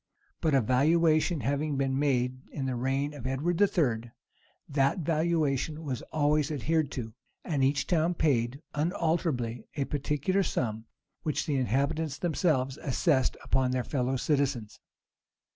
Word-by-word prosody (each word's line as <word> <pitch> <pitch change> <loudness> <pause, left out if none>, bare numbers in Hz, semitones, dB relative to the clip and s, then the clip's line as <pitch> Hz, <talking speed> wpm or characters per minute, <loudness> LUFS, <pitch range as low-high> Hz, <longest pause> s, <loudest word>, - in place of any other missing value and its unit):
[*] - - -41
But 155 -3 +2
a 135 - +5
valuation 155 - +3
having 145 +2 -1
been 135 0 0
made 130 -3 +1
in 135 - -4
the 130 - -1
reign 135 +4 -1
of 130 -4 -6
Edward 160 +8 -1
III., 125 - +2 0.6
that 140 +3 +2
valuation 155 -2 0
was 130 -6 -3
always 150 -1 +2
adhered 155 +1 0
to, 115 -4 -5 0.3
and 145 -5 0
each 135 +1 +2
town 170 0 +1
paid 135 -2 +1
unalterably 150 - -1
a 140 -2 0
particular 150 +7 0
sum, 110 - -2 0.4
which 155 - -1
the 150 -4 0
inhabitants 140 +4 0
themselves 150 -6 0
assessed 135 -1 +1
upon 130 0 +1
their 125 0 0
fellow 130 -1 -1
citizens. 135 -6 -1
140 Hz, 140 wpm, -29 LUFS, 130-155 Hz, 0.6 s, a